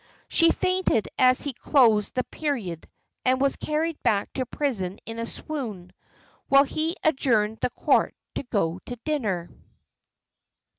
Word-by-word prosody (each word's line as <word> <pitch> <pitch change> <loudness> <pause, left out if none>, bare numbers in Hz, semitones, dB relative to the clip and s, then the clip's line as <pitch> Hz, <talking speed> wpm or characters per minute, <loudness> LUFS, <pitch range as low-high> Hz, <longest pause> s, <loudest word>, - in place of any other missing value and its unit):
She 330 -1 +4
fainted 370 - +1
as 255 0 +4
he 285 - -3
closed 230 -5 +3
the 255 - +1
period, 235 - -4 0.3
and 255 0 +2
was 275 0 +2
carried 310 +1 -2
back 200 -1 +1
to 255 -2 -2
prison 205 -11 -2
in 225 0 -6
a 230 - -3
swoon; 215 - -6 0.5
while 275 0 +7
he 315 +4 -2
adjourned 225 -8 +2
the - - +1
court - - +1 0.2
to - - -2
go 195 -9 -1
to 245 - -4
dinner. 210 - -1
255 Hz, 140 wpm, -25 LUFS, 210-295 Hz, 0.5 s, while